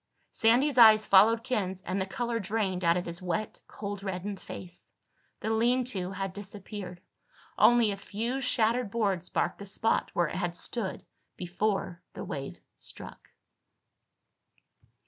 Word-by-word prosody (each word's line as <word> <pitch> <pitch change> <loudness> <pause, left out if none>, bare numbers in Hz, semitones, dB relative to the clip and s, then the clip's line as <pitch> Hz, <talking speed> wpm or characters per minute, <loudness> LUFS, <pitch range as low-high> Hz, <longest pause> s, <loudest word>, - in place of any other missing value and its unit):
Sandy's 250 +4 +3
eyes 215 -2 +8
followed 220 +4 +5
Ken's 195 -7 -2
and 190 +2 -2
the 190 - -2
color 235 +3 -2
drained 195 -3 -1
out 170 +1 +4
of 180 - -3
his 170 +1 -5
wet 185 +4 -3
cold 200 -1 -6
reddened 195 0 -4
face. 175 -1 -9 0.5
The 220 - -1
lean 240 +3 +2
to 185 -2 -3
had 195 -1 -4
disappeared. 200 -2 -7 0.6
Only 240 -3 +5
a 200 - -4
few 230 +7 -3
shattered 240 -2 +1
boards 195 -5 -1
marked 175 - 0
the 200 - -7
spot 225 +3 0
where 175 - +3
it - - -6
had 175 -2 -2
stood 210 +2 -4 0.3
before 180 -1 -2
the - - -5
wave 135 -1 -6 0.2
struck. - - -10
200 Hz, 145 wpm, -29 LUFS, 185-225 Hz, 0.6 s, eyes